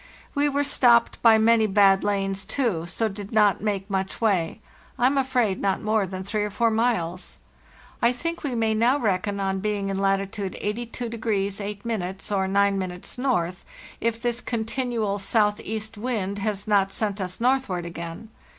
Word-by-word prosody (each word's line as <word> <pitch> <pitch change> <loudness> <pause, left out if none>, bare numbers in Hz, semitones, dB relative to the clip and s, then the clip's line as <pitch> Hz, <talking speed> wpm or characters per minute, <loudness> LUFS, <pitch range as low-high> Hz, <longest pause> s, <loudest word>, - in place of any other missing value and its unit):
We 290 0 +2
were 285 0 +1
stopped 240 -4 +3
by 225 -2 +7
many 220 0 +4
bad 195 -1 +4
lanes, 195 -1 -1
too, 205 -12 -1
so 225 +6 0
did 205 0 -7
not 210 -4 +3
make 200 -2 -2
much 190 -1 -2
way—I 215 +3 -2
am 270 +2 +3
afraid 250 -7 +1
not 195 -1 +1
more 215 -2 +1
than 185 0 -5
three 210 +2 -2
or 210 - -2
four 230 +3 +1
miles. 220 -7 -1 0.6
I 235 0 +4
think 335 +7 -4
we 270 -4 -2
may 225 -1 +1
now 235 +5 +3
reckon 200 -4 -1
on 195 -1 -1
being 205 -1 -1
in 195 0 -2
latitude 195 0 -1
82° 220 -2 -2
8' 200 -2 -4
or 190 -2 +1
9' 200 0 +2
N. 180 -1 -5 1.0
if 230 0 0
this 240 0 -1
continual 225 -3 -2
southeast 215 +1 0
wind 205 -4 -2
has 200 -1 -2
not 200 -2 +3
sent 205 -2 -2
us 185 -1 -5
northward 245 -8 +1
again. 170 +5 -7
210 Hz, 160 wpm, -25 LUFS, 195-230 Hz, 1.0 s, by